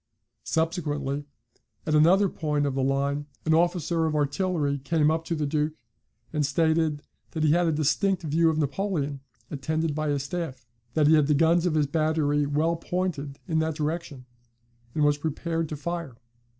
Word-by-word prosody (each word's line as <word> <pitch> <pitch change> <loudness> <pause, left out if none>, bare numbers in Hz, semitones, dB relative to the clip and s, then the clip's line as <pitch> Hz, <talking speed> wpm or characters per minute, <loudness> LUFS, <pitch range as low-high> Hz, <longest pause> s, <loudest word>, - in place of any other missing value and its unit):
Subsequently, 145 -4 -1 0.6
at 155 - 0
another 175 +7 +5
point 150 -4 -1
of 140 - -1
the 135 - -1
line, 140 +2 0 0.2
an 160 - +3
officer 170 -1 +2
of 155 - -1
artillery 145 -1 0
came 150 +2 +2
up 160 +1 -1
to 170 - -1
the 150 -1 -1
Duke, 150 +1 0 0.6
and 150 -1 +1
stated 160 0 +1 0.3
that 160 - -1
he 155 - +4
had 175 +2 +3
a - - +3
distinct 180 +5 +1
view 165 +2 +3
of 160 - 0
Napoleon, 145 -2 -1 0.3
attended 155 +2 -1
by 155 0 -1
his 140 -2 0
staff; 140 -5 -5 0.3
that 155 - +4
he 155 - +6
had 150 -3 +4
the 150 - +3
guns 165 +3 +3
of 160 - 0
his 150 -1 +3
battery 150 -1 +1
well 160 +4 +1
pointed 165 -6 -3
in 160 -3 +1
that 160 -1 0
direction, 150 -4 -4 0.7
and 150 - +2
was 145 0 +3
prepared 165 +1 -2
to 150 - -4
fire. 170 -4 -4
155 Hz, 175 wpm, -26 LUFS, 145-165 Hz, 0.7 s, he